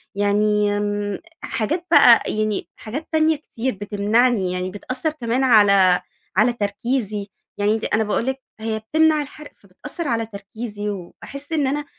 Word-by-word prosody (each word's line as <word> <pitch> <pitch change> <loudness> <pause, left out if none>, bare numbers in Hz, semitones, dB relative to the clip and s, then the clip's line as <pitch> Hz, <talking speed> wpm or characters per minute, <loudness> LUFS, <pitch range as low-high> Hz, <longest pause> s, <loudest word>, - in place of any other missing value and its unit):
يعني 205 0 +2
امم 205 -1 -2 0.2
حاجات 325 - -2
بقى - - +8
يعني 215 -1 -1
حاجات 270 +9 -6
تانية 315 0 +3
كتير 260 -4 -4
بتمنعني 205 +1 +1
يعني 180 0 -3
بتأثّر 255 - -3
كمان 250 -3 -1
على 200 -6 +5 0.3
على 220 +5 +4
تركيزي، 210 -1 -2 0.3
يعني 210 +2 +2
دي - - -3
أنا 220 0 +1
باقول 210 +2 -1
لِك 265 +1 -2 0.2
هي 220 0 -2
بتمنع 310 +7 +2
الحرق 295 +1 -10
فبتأثّر 290 - -7
على 230 -3 0
تركيزي 210 0 -6
وباحِس 210 - -8
إن 300 -4 +1
أنا، 290 +2 -2
220 Hz, 145 wpm, -21 LUFS, 205-265 Hz, 0.3 s, بقى